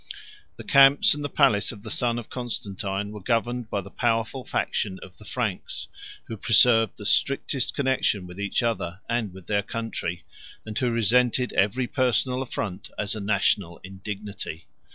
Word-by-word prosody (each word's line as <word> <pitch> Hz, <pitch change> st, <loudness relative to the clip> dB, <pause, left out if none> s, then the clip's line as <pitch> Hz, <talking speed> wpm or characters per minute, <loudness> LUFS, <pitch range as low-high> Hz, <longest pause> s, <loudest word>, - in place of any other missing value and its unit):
The -, -, -9 dB
camps 140 Hz, 0 st, +6 dB
and 145 Hz, 0 st, -5 dB
the 145 Hz, -, -2 dB
palace 100 Hz, -5 st, +3 dB
of 105 Hz, -4 st, -12 dB
the 110 Hz, -, -7 dB
son 120 Hz, +1 st, 0 dB
of 120 Hz, -, -6 dB
Constantine 105 Hz, -5 st, -4 dB
were 105 Hz, -1 st, -8 dB
governed 120 Hz, +2 st, -1 dB
by 100 Hz, -, -1 dB
the -, -, -12 dB
powerful 115 Hz, +2 st, 0 dB
faction 95 Hz, -5 st, -1 dB
of 95 Hz, -, -14 dB
the 105 Hz, -, -14 dB
Franks, 110 Hz, -7 st, -3 dB, 0.4 s
who 115 Hz, -, -7 dB
preserved 115 Hz, +1 st, +5 dB
the 105 Hz, -, -9 dB
strictest 135 Hz, +2 st, +1 dB
connection 130 Hz, -8 st, +1 dB
with 90 Hz, +2 st, -10 dB
each 100 Hz, +3 st, 0 dB
other, 95 Hz, -6 st, -2 dB
and 115 Hz, -4 st, -1 dB
with 95 Hz, -1 st, -12 dB
their 100 Hz, +1 st, +1 dB
country, 105 Hz, -6 st, -4 dB, 0.4 s
and 110 Hz, -1 st, -7 dB
who 130 Hz, -3 st, +1 dB
resented 125 Hz, +2 st, +2 dB
every 105 Hz, +6 st, +2 dB
personal 130 Hz, 0 st, +1 dB
affront 105 Hz, -7 st, -4 dB
as 105 Hz, -, -1 dB
a 110 Hz, -, -4 dB
national 100 Hz, -3 st, +1 dB
indignity. 100 Hz, -2 st, -6 dB
110 Hz, 165 wpm, -25 LUFS, 100-125 Hz, 0.4 s, camps